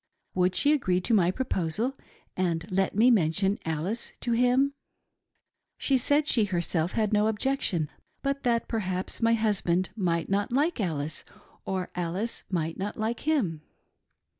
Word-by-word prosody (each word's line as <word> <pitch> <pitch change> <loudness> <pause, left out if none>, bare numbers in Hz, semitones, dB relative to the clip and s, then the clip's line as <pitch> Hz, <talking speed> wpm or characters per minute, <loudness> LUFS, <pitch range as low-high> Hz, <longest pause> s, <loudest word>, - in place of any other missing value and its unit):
Would 180 0 +1
she 290 +1 +4
agree 185 -11 +1
to 230 - -1
my 180 -5 +4
proposal 215 +1 -1 0.4
and 170 -3 -1
let 190 +1 +1
me 235 +4 +5
mention 195 0 +2
Alice 165 +8 -2
to 240 - -1
him? 250 +4 +3 0.5
" - - -50 0.3
She 275 - +2
said, 285 +4 +3
she 230 -7 +4
herself, 175 -2 -1
had 215 -2 0
no 210 +1 +3
objection, 220 - 0 0.4
but 275 0 -1
that 235 -2 +1
perhaps 185 -4 -2
my 230 0 +4
husband 190 -5 +1
might 170 -5 0
not 200 +2 0
like 295 +6 +1
Alice, 155 -4 -3 0.4
or 185 -1 -3
Alice 180 +6 -2
might 165 -2 -2
not 200 +2 -4
like 220 +2 -2
him. 200 - +1
200 Hz, 150 wpm, -27 LUFS, 180-235 Hz, 0.5 s, me